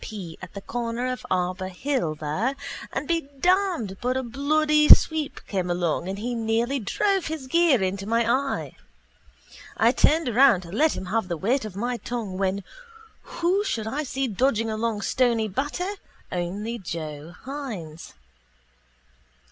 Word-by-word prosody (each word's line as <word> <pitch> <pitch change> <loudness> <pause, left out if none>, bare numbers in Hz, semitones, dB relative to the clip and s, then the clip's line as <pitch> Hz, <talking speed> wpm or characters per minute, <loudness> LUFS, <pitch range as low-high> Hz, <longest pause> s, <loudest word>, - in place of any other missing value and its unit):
P. 185 -7 -7
at 185 0 -10
the 200 - -5
corner 235 +2 -3
of 255 - -5
Arbour 185 0 0
hill 190 - -1
there 160 - -1 0.4
and 270 +2 -3
be 330 -4 0
damned 355 - +2
but 255 +1 0
a 260 - -1
bloody 300 +4 +2
sweep 315 -3 +6
came 185 -3 -2
along 175 -1 0
and 195 - -3
he 240 +4 -3
near 225 0 +1
drove 390 - 0
his 315 -4 -4
gear 295 - +4
into 195 +1 -2
my 230 +1 +2
eye. 270 +3 0 1.0
I 230 +2 +5
turned 310 +4 +3
around 245 -4 +5
to 170 -2 -11
let 305 - +2
him - - -5
have 210 +2 -1
the 170 -2 -2
weight 230 - +1
of 205 -4 -7
my 240 +4 -1
tongue 215 -4 -4
when 195 0 0 0.6
who 365 +4 0
should 225 - -2
I 270 +7 -2
see 270 -2 -2
dodging 225 0 +1
along 215 -1 -1
Stony 235 -4 +2
Batter 290 - -2 0.4
only 200 +7 -3
Joe 160 -2 -6
Hynes. 220 - -7
230 Hz, 155 wpm, -25 LUFS, 190-275 Hz, 1.0 s, sweep